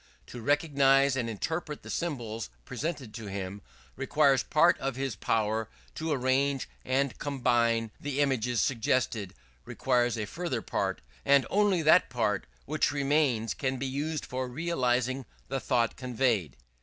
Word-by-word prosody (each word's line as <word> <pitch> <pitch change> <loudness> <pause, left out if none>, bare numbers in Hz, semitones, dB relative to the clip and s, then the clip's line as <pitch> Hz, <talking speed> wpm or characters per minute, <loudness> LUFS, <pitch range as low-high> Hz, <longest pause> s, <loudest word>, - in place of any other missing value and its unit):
To 120 - -9
recognize 140 -1 +3
and 120 -3 -1
interpret 150 - -4
the - - -7
symbols 115 - -3 0.2
presented 145 -8 -4
to 115 -2 -7
him, 100 0 -5 0.3
requires 135 0 +3
part 160 +3 +4
of 135 -2 -2
this 135 -4 -2
power; 110 +1 0 0.2
to 160 0 -3
arrange 135 0 +1 0.2
and 135 0 0
combine 120 -5 +1
the 145 -1 -3
images 125 -5 +1
suggested 115 -5 0 0.3
requires 120 - +1
a 105 - -2
further 130 -1 -3
part; - - -2 0.2
and 140 -1 +5
only 200 -4 +3
that 155 +4 +5
part 110 -5 0 0.2
which 155 +1 +1
remains 140 - +1
can 130 +6 -2
be 135 - -3
used 145 +4 -2
for 130 0 -3
realizing 130 -3 0 0.3
the 135 0 -1
thought 120 -3 +1
conveyed. 120 - 0
130 Hz, 140 wpm, -29 LUFS, 115-145 Hz, 0.3 s, and